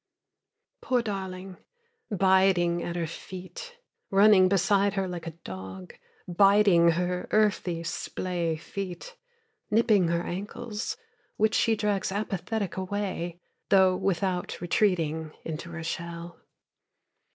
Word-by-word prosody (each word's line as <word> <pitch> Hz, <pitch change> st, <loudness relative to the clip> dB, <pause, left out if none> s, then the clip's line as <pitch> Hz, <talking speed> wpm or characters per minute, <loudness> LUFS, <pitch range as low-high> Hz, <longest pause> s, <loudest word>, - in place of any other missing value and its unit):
Poor 250 Hz, -2 st, +1 dB
darling, 190 Hz, -3 st, -5 dB, 0.5 s
biting 190 Hz, -3 st, +3 dB
at 170 Hz, -, -4 dB
her 170 Hz, -1 st, -1 dB
feet, 190 Hz, -, -9 dB, 0.3 s
Running 195 Hz, -1 st, +6 dB
beside 200 Hz, +1 st, +2 dB
her 195 Hz, -1 st, 0 dB
like 175 Hz, -2 st, -6 dB
a 165 Hz, 0 st, -7 dB
dog, 95 Hz, -1 st, -8 dB, 0.3 s
biting 195 Hz, -2 st, +5 dB
her 180 Hz, +1 st, -2 dB
earthy, 190 Hz, -5 st, +1 dB
splay 170 Hz, 0 st, -2 dB
feet, 195 Hz, -, -7 dB, 0.5 s
Nipping 210 Hz, -4 st, +4 dB
her 170 Hz, +1 st, 0 dB
ankles, 210 Hz, +4 st, -5 dB, 0.4 s
Which 220 Hz, +1 st, +2 dB
she 225 Hz, -, +3 dB
drags 205 Hz, -3 st, -1 dB
apathetic 200 Hz, 0 st, -3 dB
away, 185 Hz, -3 st, -3 dB, 0.3 s
though 190 Hz, -2 st, +5 dB
without 180 Hz, -1 st, -1 dB
retreating 165 Hz, -4 st, 0 dB
into 160 Hz, +1 st, -5 dB
her 170 Hz, -1 st, -6 dB
shell. 170 Hz, +1 st, -6 dB
185 Hz, 105 wpm, -27 LUFS, 170-200 Hz, 0.5 s, Running